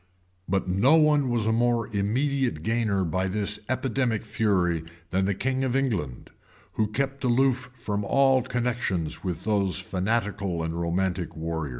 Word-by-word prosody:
[] 90 0 -25
But 95 0 0
no 100 - +4
one 150 -4 +4
was 120 -3 0
a 110 - +2
more 120 0 +2
immediate 125 - 0
gainer 110 -3 +1
by 95 +3 -1
this 105 +2 -1
epidemic 130 -3 0
fury 95 -7 +1 0.3
than 95 +1 +1
the 100 0 0
king 130 +4 -1
of 130 -1 0
England, 100 - -2 0.4
who 110 - 0
kept 135 +5 -2
aloof 130 +1 +2
from 105 -4 -3
all 135 +4 +4
connections 115 -11 -2
with 90 -2 -3
those 100 -6 +1
fanatical 100 -3 -1
and 80 0 -2
romantic 85 +1 -1
warriors. 80 -2 -3
105 Hz, 155 wpm, -26 LUFS, 90-125 Hz, 0.4 s, no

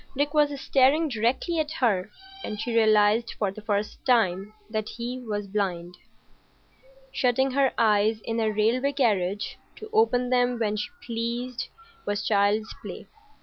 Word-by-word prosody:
Dick 290 +1 0
was 290 -2 +2
staring 280 +5 +3
directly 250 +8 0
at 305 -1 -1
her, 215 - +1 0.3
and 210 - -5
she 235 +2 -3
realised 220 +1 +3
for 205 -3 0
the 215 - -10
first 210 -1 -2
time 210 -5 +2 0.2
that 215 -1 -3
he 245 +2 -5
was 210 -4 -4
blind. 180 -3 -3 1.2
Shutting 265 +1 +1
her 270 0 +2
eyes 215 0 +3
in 230 +1 -3
a 220 -1 +1
railway 230 +6 +1
carriage 205 -7 0 0.2
to 435 0 -11
open 250 - +2
them 245 -1 +2
when 215 -2 0
she 210 - -3 0.2
pleased 235 +2 -3 0.4
was 205 -1 -1
child's 205 +1 +1
play. - - -8
230 Hz, 150 wpm, -26 LUFS, 210-255 Hz, 1.2 s, staring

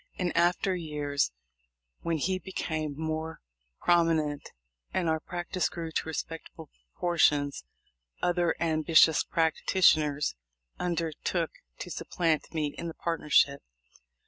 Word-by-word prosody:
In 180 -2 -1
after 175 +2 +2
years, 150 - -1 0.7
when 165 -1 -1
he 185 +5 0
became 155 -6 -3
more 160 0 -3 0.4
prominent, 160 -4 +2 0.4
and 180 -2 0
our 160 0 +2
practice 175 +1 -2
grew 165 -2 -5
to 160 - -2
respectable 160 -1 -6 0.2
proportions, 145 - +2 0.6
other 175 -1 +1
ambitious 160 -1 +4
practitioners 155 -3 +2 0.5
under 170 -2 -1
took 170 -3 0 0.3
to - - -7
supplant 165 -3 -1
me 150 -3 -1
in 170 - -4
the 165 - -6
partnership. 150 -4 +2
160 Hz, 110 wpm, -29 LUFS, 155-175 Hz, 0.7 s, ambitious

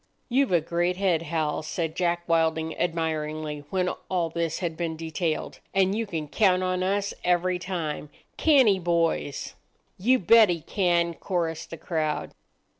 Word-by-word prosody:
"You've 265 -1 +2
a 175 -2 +4
great 175 +3 0
head, 185 -5 +2
Hal," 155 -2 -1
said 160 +1 -3
Jack 175 -1 0
Wilding 160 -1 +1
admiringly, 155 -3 -2
when 185 -1 0 0.2
all 175 -3 0
this 165 -1 -1
had 170 -3 -3
been 165 -1 -3
detailed, 160 0 -3 0.2
"and 190 0 +3
you 225 0 -2
can 160 -6 -4
count 185 +3 +3
on 185 0 0
us 200 +2 0
every 180 0 +1
time—can't 185 - 0
he, 195 -2 +4
boys?" 170 -4 0 0.5
"You 250 +7 +4
bet 220 +1 +6
he 170 -2 -1
can," 170 -1 +1
chorused 165 -2 -3
the 165 - -7
crowd. 155 -2 -2
170 Hz, 150 wpm, -26 LUFS, 160-185 Hz, 0.5 s, bet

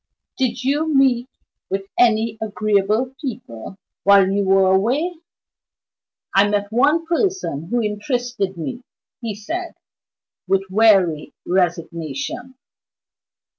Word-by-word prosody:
Did 255 -2 -1
you 295 +4 0
meet 260 -3 +3 0.4
with 195 +1 -2
any 225 -2 +2
agreeable 215 +3 0
people, 195 - -7 0.3
while 200 -1 +6
you 200 +1 +1
were 190 0 +4
away?" 275 - +1 1.2
"I 200 +1 +5
met 205 0 -1
one 295 +8 +2
person 340 - -1
who 240 -1 0
interested 210 -2 -2
me," 240 +9 -5 0.4
he 225 -3 -4
said, 335 - -5 0.7
with 195 0 +2
weary 190 -7 +3
resignation. 175 - -2
215 Hz, 100 wpm, -20 LUFS, 195-255 Hz, 1.2 s, while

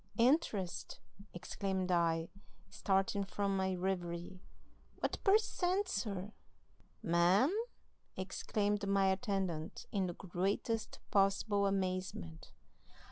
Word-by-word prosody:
"'Interest?' 210 - +1 0.3
exclaimed 190 +1 -2
I, 165 -1 +2 0.4
starting 195 +1 +1
from 195 +1 -1
my 190 -1 0
reverie. 180 -1 -3 0.6
'What - - -2
per 400 +1 +7
cent, 385 -2 0
sir?' 205 - -3 0.7
"'Ma'am?' 180 - +4 0.6
exclaimed 205 +2 -1
my 195 0 +3
attendant, 190 -6 -2
in 195 -3 0
the 175 - -5
greatest 195 +5 -2
possible 200 +1 +3
amazement. 185 - -3
195 Hz, 90 wpm, -35 LUFS, 180-205 Hz, 0.7 s, per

